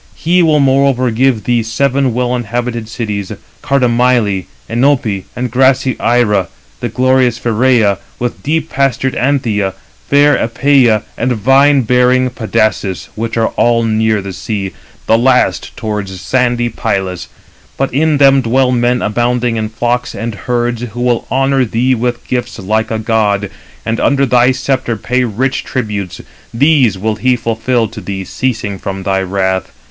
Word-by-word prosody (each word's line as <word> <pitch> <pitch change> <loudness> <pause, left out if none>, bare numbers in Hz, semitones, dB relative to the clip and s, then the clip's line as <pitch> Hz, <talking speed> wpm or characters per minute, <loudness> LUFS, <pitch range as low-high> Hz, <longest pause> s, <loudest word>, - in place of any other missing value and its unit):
He 180 +2 +2
will 155 -3 +3
moreover 135 -2 +2
give 125 -1 +1
thee 120 -1 +1
seven 135 +3 0
well 125 0 0
inhabited 120 -1 -3
cities,—Cardamyle, 115 - -1 0.2
Enope, 115 -6 0
and 125 -1 -3
grassy 130 0 +2
Ira, 110 -5 +2 0.5
glorious 130 -1 +2
Pheræ, 115 -4 +2 0.2
with 120 0 -4
deep 160 +2 -1
pastured 135 -1 0
Anthea, 115 -7 0 0.3
fair 145 +1 +5
Æpeia, 120 -2 +2 0.2
and 125 +1 +1
vine 135 +5 +4
bearing 125 +2 +2
Pedasus; 110 -5 -1
which 115 +1 -4
are 115 - +2
all 120 -1 +1
near 110 -2 +1
the 95 -1 -6
sea, 100 -1 -4 0.3
the 115 - +3
last 125 +1 +1
towards 105 -4 -4
sandy 120 +1 0
Pylus. 95 - -3 0.5
But 135 -2 -1
in 155 +2 +2
them 135 -1 +5
dwell 125 +2 +1
men 125 0 +1
abounding 120 +2 0
in 110 -1 -2
flocks 120 +2 -2
and 115 0 -4
herds, 120 +3 -2
who 120 0 -6
will 120 -1 0
honour 135 0 +2
thee 125 +2 +1
with 120 0 -2
gifts 120 -1 -3
like 110 +3 -1
a 110 - -1
god, 105 -3 0 0.3
and 115 +1 -1
under 140 -1 +2
thy 125 0 +3
sceptre 130 -3 -1
pay 125 +4 0
rich 125 +4 -1
tributes. 105 -7 -4 0.3
These 130 -5 +3
will 110 +2 -2
he 125 +2 +2
fulfil 115 0 -1
to - - -9
thee 95 -1 -5
ceasing 110 -6 -3
from 95 0 -5
thy 95 -1 0
wrath. 95 0 -1
120 Hz, 145 wpm, -14 LUFS, 110-130 Hz, 0.5 s, fair